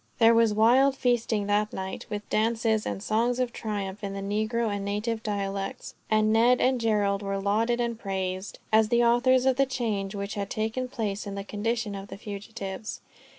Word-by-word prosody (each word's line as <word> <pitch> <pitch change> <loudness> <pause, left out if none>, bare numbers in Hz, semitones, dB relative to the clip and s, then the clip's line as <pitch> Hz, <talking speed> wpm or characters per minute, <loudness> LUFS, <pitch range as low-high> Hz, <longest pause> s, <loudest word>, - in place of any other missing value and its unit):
There 230 0 +6
was 230 -1 +4
wild 245 +6 +4
feasting 235 -5 +1
that 210 +1 +1
night, 190 0 -5
with 210 0 -5
dances, 220 0 +1
and 195 - -4
songs 235 +3 +1
of 250 -2 -1
triumph 205 -2 -4
in 195 -1 -3
the 195 - -4 0.3
negro 230 -2 0
and 200 - -4
native 210 +3 -2
dialects; 200 -2 -3 0.2
and 215 0 +3
Ned 240 +3 +5
and 255 -1 +2
Gerald 205 -3 +1
were 195 -1 -2
lauded 220 +5 +1
and 235 -1 -1
praised, 190 -2 -3 0.2
as 220 0 +5
the 240 0 +3
authors 250 +2 +4
of 260 -1 +3
the 275 0 +3
change 210 -6 -2
which 200 +1 -4
had 200 -1 -3
taken 220 +4 -2
place 210 -5 -3
in 200 - -5
the 200 - -4
condition 220 +1 -2
of 195 0 -7
the - - -8
fugitives. 200 0 -6
215 Hz, 190 wpm, -27 LUFS, 200-235 Hz, 0.3 s, There